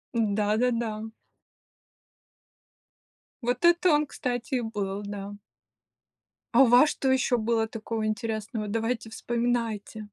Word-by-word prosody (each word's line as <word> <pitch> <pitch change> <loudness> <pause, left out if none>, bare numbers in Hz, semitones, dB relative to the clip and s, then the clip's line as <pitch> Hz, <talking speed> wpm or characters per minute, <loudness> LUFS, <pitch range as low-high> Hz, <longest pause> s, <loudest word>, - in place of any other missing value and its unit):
Да-да-да. 220 +1 0 2.3
Вот 245 +6 0
это 345 +1 +5
он, 295 0 +3
кстати, 245 -1 -3
и 245 - +1
был, 205 -3 -3
да. 200 0 -6 1.2
А 270 - +7
у - - +6
вас 250 +6 +6
что 265 -1 0
ещё 255 -1 +2
было 225 0 +1
такого 225 -1 -4
интересного? 215 0 -3
Давайте 225 +1 -2
вспоминайте. 230 -2 -2
225 Hz, 105 wpm, -27 LUFS, 215-245 Hz, 2.3 s, А